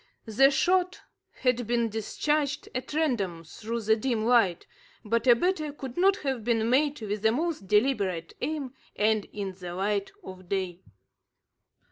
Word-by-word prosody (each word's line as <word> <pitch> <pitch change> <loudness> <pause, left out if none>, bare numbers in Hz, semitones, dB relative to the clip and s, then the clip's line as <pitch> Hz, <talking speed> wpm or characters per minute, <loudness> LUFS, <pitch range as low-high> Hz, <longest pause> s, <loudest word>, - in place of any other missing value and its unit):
The 250 +5 +5
shot 365 +6 +1 0.4
had 250 -3 +1
been 235 -1 +1
discharged 285 +7 -1
at 255 +3 -5
random 205 - 0
through 230 +8 -5
the 220 0 +3
dim 225 -1 -1
light, 225 -8 +3 0.4
but 230 +3 0
a 240 - +8
better 310 +1 0
could 265 -3 -8
not 385 +2 +4
have 265 -5 -1
been 225 -1 +1
made 290 +2 +2
with 210 -1 -3
the 220 +1 +4
most 305 - -2
deliberate 200 -6 +1
aim, 275 -2 -3 0.2
and 215 0 +2
in 200 -2 -5
the 180 -1 -8
light 200 +1 -1
of 185 - -11
day. 185 -2 -2
230 Hz, 150 wpm, -27 LUFS, 205-275 Hz, 0.4 s, a